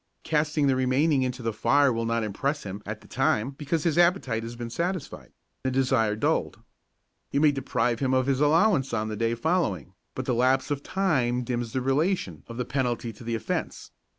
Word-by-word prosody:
Casting 150 -1 +1
the 135 -1 +3
remainder 130 +2 +2
into 125 -1 -3
the 115 -1 -1
fire 140 +3 +3
will 115 0 -2
not 115 0 0
impress 140 +8 -2
him 100 +1 -6
at - - -5
the - - -17
time 115 +6 +1
because 150 +3 -2
his 170 0 +1
appetite 170 -10 +2
has 115 +1 -7
been 120 -1 -6
satisfied, 175 +3 -4 0.3
the 130 - +1
desire 130 -4 +2
is 105 - -7
dulled. - - 0 0.7
You - - 0
may 150 0 +5
deprive 125 -4 -1
him 130 -1 0
of 130 -1 +2
his 135 0 +1
allowance 150 - +3
on 110 -1 -1
the 110 - -3
day 115 +2 0
following, 120 - -1 0.2
but - - -4
the 125 - 0
lapse 130 +4 +2
of 140 -1 -1
time 130 -11 0
dims 120 -1 -3
the 130 - 0
relation 135 - 0
of 115 - -8
the 125 - -2
penalty 125 -3 -2
to 110 - -13
the 115 0 -2
offence. 110 - -4
130 Hz, 205 wpm, -26 LUFS, 115-145 Hz, 0.7 s, may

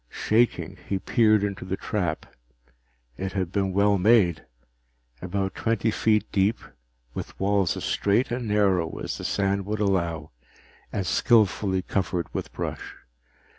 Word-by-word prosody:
Shaking, 115 +2 0
he 100 - +1
peered 110 +1 +3
into 100 -2 -3
the 95 +1 -3
trap. 90 -7 -2 0.9
It 95 0 -4
had 95 -3 -2
been 95 -1 0
well 100 +1 +3
made 95 -5 +4 0.8
about 95 +1 -2
twenty 115 -1 0
feet 105 -1 +2
deep, 100 +3 +2 0.6
with - - -7
walls 100 -2 +1
as - - -5
straight 105 +5 +1
and 120 -1 -2
narrow 95 -6 +1
as - - -5
the - - -6
sand 100 -1 0
would 105 0 -2
allow, 85 -6 -1 0.6
and 100 - -2
skillfully 95 -1 +2
covered 90 -3 -1
with - - -4
brush. - - -5
100 Hz, 135 wpm, -25 LUFS, 95-105 Hz, 0.9 s, made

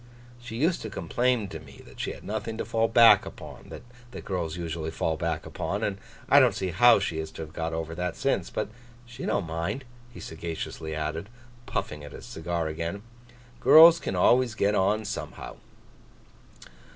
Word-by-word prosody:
She 120 -2 -8
used 160 +8 +1
to 110 - -5
complain 115 +6 0
to - - -7
me - - -14
that - - -15
she - - -2
had - - -13
nothing 110 +1 -4
to - - -3
fall 115 0 +1
back 115 0 +7
upon, - - -11
that 120 0 -12
girls 85 -4 -3
usually 80 -2 -4
fall 80 0 -1
back 80 0 -3
upon; - - -3
and 100 -1 -2 0.3
I 145 - +7
don't 125 -7 +4
see 95 -2 -2
how 120 +8 +6
she 90 -5 -2
is 80 0 -4
to 80 - -6
have 75 0 -11
got 80 -1 -3
over 80 0 -4
that 90 0 -3
since. - - -1
But - - -3 0.4
she 120 +2 -7
don't 100 - 0
mind,' 85 +11 -3 0.3
he - - -11
sagaciously 80 -1 -6
added, 80 +5 -4 0.4
puffing 75 -1 -3
at 75 - -10
his - - -10
cigar 85 0 -3
again. 85 +6 -4 0.6
'Girls 165 +1 +8
can 95 - -3
always 120 +5 +3
get 105 -1 +2
on, 105 +2 +1
somehow. 100 - -6
95 Hz, 180 wpm, -27 LUFS, 80-115 Hz, 0.6 s, Girls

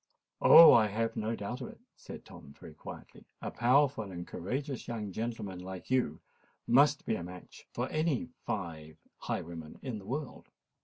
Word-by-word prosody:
"Oh! 165 - +10
I 110 -2 +5
have 115 +2 -2
no 110 +2 -2
doubt 120 +6 -5
of 125 - -5
it," - - -13 0.2
said - - -11
Tom 70 - -13
very - - -11
quietly. - - -11 0.2
"A - - -5
powerful 125 -3 +2
and 85 -2 -7
courageous 135 - -4
young 110 -4 -4
gentleman 105 -3 -4
like 95 +4 -8
you 125 - +1 0.5
must 145 +4 +4
be - - 0
a 90 - -3
match 90 +1 -11
for - - -2
any 155 -6 0 0.2
five 80 -5 -5 0.2
highwaymen 80 -2 -5
in 125 -6 -4
the 95 - -13
world." 140 +3 -5
110 Hz, 165 wpm, -31 LUFS, 90-130 Hz, 0.5 s, Oh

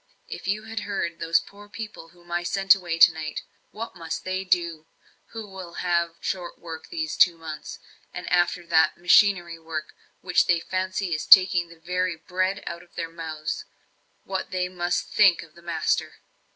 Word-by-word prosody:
If - - -8
you 210 +2 -1
had 225 0 -5
heard 195 -5 -3
those 165 +1 +3
poor 205 +1 -14
people 210 -6 -8
whom 175 +1 -19
I 175 0 0
sent 195 +2 +4
away 175 -4 -3
tonight! 160 -2 +4 0.3
What 225 0 -7
must 165 -2 -5
they, 185 0 -2 0.8
who 225 -2 -8
will 190 -3 -9
have 170 -2 0
short 180 -2 -4
work 160 -2 -9
these 160 -2 -3
two 175 -2 +5
months, 160 -2 -7 0.3
and 180 - -7
after 175 0 +2
that 165 -1 +3
machinery 175 -1 +4
work, 160 -2 -6 0.3
which 180 -1 +2
they 175 -1 +3
fancy 185 +1 -2
is 155 - -3
taking 185 -2 +7
the 170 - -14
very 180 +1 -1
bread 185 +4 -2
out 170 0 -5
of 175 - -21
their 165 -1 -4
mouths 160 -2 -5 0.6
what 190 0 -4 0.2
must 175 -1 -1
they - - -10
think 195 -6 +5
of 160 -2 -17
the 170 - -17
master?" 170 -2 -1
175 Hz, 170 wpm, -25 LUFS, 165-190 Hz, 0.8 s, taking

